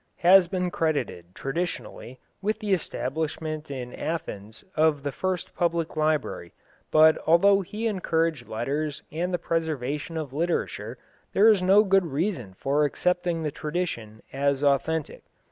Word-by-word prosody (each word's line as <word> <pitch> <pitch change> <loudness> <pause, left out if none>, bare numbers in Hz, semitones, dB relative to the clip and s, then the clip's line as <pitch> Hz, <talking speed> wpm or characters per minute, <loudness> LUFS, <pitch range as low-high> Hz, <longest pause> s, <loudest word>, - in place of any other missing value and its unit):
has 185 0 +8
been 180 0 -2
credited, 145 - -1
traditionally, 135 -4 -4 0.2
with 215 +2 0
the 210 -3 -1
establishment 155 -1 -3
in 125 -3 -6
Athens 110 - -5
of 155 -2 +2
the 145 - -2
first 185 +3 -3
public 170 -2 -1
library, 155 - -1 0.3
but 155 0 +6
although 195 +5 +5
he 210 +5 -5
encouraged 165 - 0
letters 140 +6 -3
and 175 +4 -2
the 175 - +1
preservation 160 -2 -2
of 150 -4 -5
literature 135 - -2 0.4
there 205 +3 +6
is 210 -4 +4
no 195 +3 +6
good 195 -3 +3
reason 140 - -2
for 140 +8 +1
accepting 175 +2 0
the 150 - -1
tradition 150 -11 -4
as 140 +1 0
authentic. 145 +2 0
160 Hz, 135 wpm, -26 LUFS, 140-180 Hz, 0.4 s, has